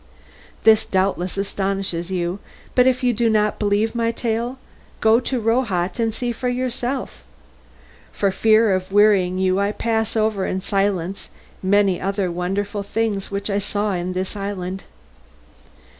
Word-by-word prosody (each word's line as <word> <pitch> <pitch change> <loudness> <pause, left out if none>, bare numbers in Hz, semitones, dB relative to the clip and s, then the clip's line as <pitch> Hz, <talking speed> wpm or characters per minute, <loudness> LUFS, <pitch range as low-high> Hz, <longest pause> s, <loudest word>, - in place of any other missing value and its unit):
This 220 -1 +6
doubtless 190 -1 0
astonishes 195 -3 -2
you, 180 0 -2 0.3
but 250 0 +5
if 255 0 +1
you 245 -1 +3
do 230 +1 +2
not 210 -1 +1
believe 210 +1 +1
my 230 -1 0
tale 235 +2 -2 0.4
go 220 +1 +5
to 255 0 -2
Rohat 225 -4 0
and 225 -1 +1
see 240 +2 -3
for 250 +2 -2
yourself. 250 +1 -3 0.9
For 200 -1 0
fear 220 +1 +4
of 185 0 -2
wearying 200 -3 +4
you 190 0 +2
I 200 +1 +1
pass 225 0 -1
over 215 -3 +1
in 190 - -2
silence 195 -2 -1 0.3
many 195 -1 +2
other 195 -1 -1
wonderful 195 +4 -2
things 200 -1 -2
which 200 0 -3
we 200 -1 0
saw 205 0 -1
in 180 0 -2
this 185 +2 -3
island. 195 -2 -4
205 Hz, 145 wpm, -21 LUFS, 190-225 Hz, 0.9 s, This